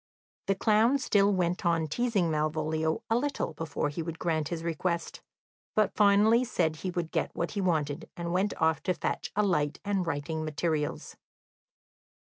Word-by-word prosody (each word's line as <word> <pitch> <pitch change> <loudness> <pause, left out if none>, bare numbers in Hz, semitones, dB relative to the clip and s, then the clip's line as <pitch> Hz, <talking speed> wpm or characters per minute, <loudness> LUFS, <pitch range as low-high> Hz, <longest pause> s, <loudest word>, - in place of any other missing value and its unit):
The 195 - +2
clown 220 +6 +3
still 205 -6 +3
went 180 -2 0
on 165 -2 +2
teasing 200 -1 0
Malvolio 155 +1 -1
a 225 - +1
little 270 - -1
before 150 -1 -2
he 145 +3 -4
would 165 0 -5
grant 160 -3 -1
his 165 -1 -4
request, 170 +1 -2 0.5
but 215 -2 +2
finally 210 +3 +5
said 160 -10 0
he 185 - -4
would 175 -2 -3
get - - 0
what 170 - -2
he 200 - -2
wanted, 155 -6 -1
and 170 0 -3
went 190 +3 0
off 160 -1 +2
to 180 - +2
fetch - - -3
a 210 - +3
light 150 -7 0
and 195 -3 0
writing 160 +1 -2
materials. 155 -1 -2
170 Hz, 165 wpm, -29 LUFS, 155-200 Hz, 0.5 s, finally